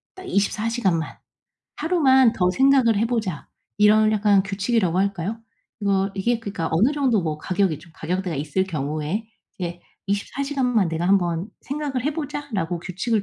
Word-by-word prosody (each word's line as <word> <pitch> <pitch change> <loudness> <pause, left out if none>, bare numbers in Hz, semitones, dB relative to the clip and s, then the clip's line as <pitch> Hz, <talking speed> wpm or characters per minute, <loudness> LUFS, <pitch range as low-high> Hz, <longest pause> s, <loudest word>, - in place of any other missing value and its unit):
딱 375 - -10
24 210 - 0
시간만 190 -9 0 0.6
하루만 270 -7 +4
더 180 -4 +1
생각을 260 +1 +4
해보자.' 220 -6 -1 0.3
이런 215 +1 +5
약간 205 -2 +4
규칙이라고 195 -2 0
할까요? 200 +2 -1 0.4
이거 195 -1 +1
이게 230 +5 0
그러니까 200 -7 -4
어느 210 - +3
정도 260 -9 +1
뭐 155 -2 -2
가격이 185 -2 0
좀 170 +2 -17
가격대가 180 -1 -3
있을 150 +6 0
경우에 155 +5 -3 0.3
이제 175 -1 -4 0.3
'24 205 +7 -2
시간만 250 - +1
내가 165 +2 -1
한번 180 -1 +1
생각을 280 -3 -3
해보자.'라고 285 - -3
규칙을 200 +5 -1
200 Hz, 325 characters per minute, -23 LUFS, 180-240 Hz, 0.6 s, 이런